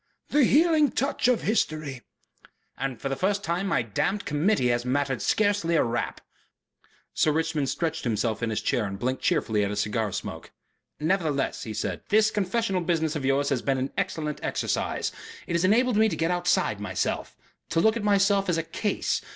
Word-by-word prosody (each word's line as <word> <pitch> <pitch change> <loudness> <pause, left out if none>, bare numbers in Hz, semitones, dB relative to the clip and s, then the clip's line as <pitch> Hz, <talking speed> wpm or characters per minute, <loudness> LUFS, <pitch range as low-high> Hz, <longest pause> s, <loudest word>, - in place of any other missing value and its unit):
"The 290 -2 +4
healing 310 +1 +4
touch 270 +1 0
of 250 -2 +2
history." 155 - -1 0.7
"And 135 -4 -4
for - - -3
the 135 - -1
first 200 +5 0
time 175 +4 -1
my 130 -10 +1
damned 185 - -1
Committee 150 -2 +2
has 120 0 +1
mattered 135 +1 -1
scarcely 205 -5 +1
a - - +4
rap." 120 0 -2 0.9
Sir 155 - +2
Richmond 160 -3 0
stretched 160 -1 -2
himself 110 -1 -1
in 115 - 0
his 110 - -2
chair 120 -5 +1
and 100 -1 -5
blinked 130 +5 -2
cheerfully 105 -3 +1
at 100 - 0
his 105 0 -1
cigar 105 0 -1
smoke. - - -6 0.5
"Nevertheless," 155 -4 0
he 110 - -5
said, 95 -4 -3
"this 215 +1 +4
confessional 195 -1 0
business 160 -2 0
of 140 -3 -3
yours 140 +1 +2
has 135 -4 0
been 135 -1 0
an 130 +1 -2
excellent 160 -6 -2
exercise. - - -1 0.3
It - - -4
has 170 +1 +1
enabled 230 +4 +3
me 220 0 +5
to - - -2
get 165 +2 0
outside 175 - +1
myself, 105 -3 -3 0.3
to - - +1
look 220 +5 +4
at 230 - -2
myself 200 -1 +3
as 170 - +2
a 165 - 0
Case. 200 +6 -1
160 Hz, 185 wpm, -26 LUFS, 130-200 Hz, 0.9 s, me